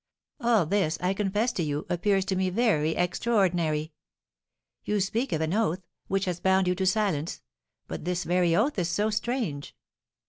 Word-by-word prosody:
All 230 - +3
this, 160 -3 +1
I 180 +1 0
confess 210 +4 0
to 185 - -3
you, 150 -2 -2
appears 195 +2 +1
to 195 - -1
me 185 0 +1
very 180 -7 +1
extraordinary. 175 -5 0 0.9
You 210 0 0
speak 225 +7 -1
of 160 - 0
an 160 +2 0
oath, 190 -4 0 0.2
which 195 +1 0
has 180 -2 -2
bound 190 0 +3
you 180 - +3
to 190 +1 -1
silence; 185 -6 0 0.4
but - - -6
this 180 +1 -1
very 175 -1 +2
oath 225 - +1
is 175 -1 0
so 205 +5 0
strange!" 215 - -3
185 Hz, 170 wpm, -27 LUFS, 170-210 Hz, 0.9 s, All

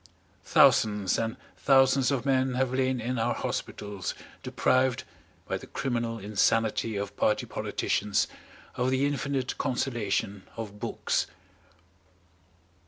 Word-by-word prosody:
Thousands 105 -3 +4
and 115 +2 -2 0.2
thousands 135 -1 +4
of 135 -2 -1
men 130 -1 +2
have 130 0 0
lain 130 -1 +1
in 120 +1 -2
our 120 +1 +1
hospitals 100 -3 -4 0.3
deprived, 130 -1 +1 0.4
by - - -1
the - - -12
criminal 120 -3 -2
insanity 110 +2 +1
of 100 0 -4
party 105 - +1
politicians, 105 -1 0 0.5
of 125 +1 0
the 130 +1 +2
infinite 140 -2 -2
consolation 115 -7 -1 0.2
of 105 -2 -6
books. - - -1
120 Hz, 110 wpm, -28 LUFS, 105-130 Hz, 0.5 s, Thousands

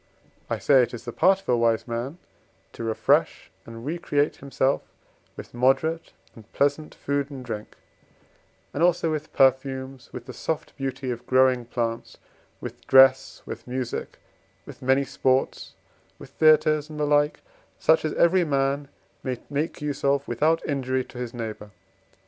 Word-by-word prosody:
I - - -1
say 135 -3 +5
it 120 - -1
is 115 - -11
the 120 - -5
part 195 +1 +3
of - - -29
a 125 - +4
wise 115 -1 +1
man 120 +7 -4 0.6
to - - -7
refresh 110 -1 +1 0.2
and 115 +1 -9
recreate 150 -2 0
himself 135 0 0 0.6
with - - -10
moderate 135 +7 +1 0.2
and 110 -3 -16
pleasant 145 +2 0
food 140 0 -2
and 135 -3 -8
drink, 110 -3 -6 1.0
and 145 - -3
also 170 -2 +3
with 155 0 -4
perfumes, 130 -1 +1
with 125 -1 -8
the 130 - -8
soft 160 +4 -4
beauty 135 -1 -3
of 120 0 -7
growing 130 -1 +3
plants, 115 -1 -3 0.4
with 120 0 -9
dress, 135 -1 +5
with - - -8
music, 125 -1 -4 0.5
with 145 -1 -12
many 130 +2 +3
sports, 130 -1 -1 0.4
with - - -13
theatres, 155 -1 +4
and 155 -1 -8
the 150 - +1
like, 145 0 +2 0.4
such - - +3
as - - -1
every 180 +2 +4
man 140 -1 0 0.3
may 130 -1 -3
make 145 +1 -2
use 145 -2 -3
of 140 0 +1
without 155 +7 +1
injury 130 -2 -1
to 125 - -11
his 125 -2 -4
neighbour. 110 -3 -6
135 Hz, 155 wpm, -25 LUFS, 125-145 Hz, 1.0 s, say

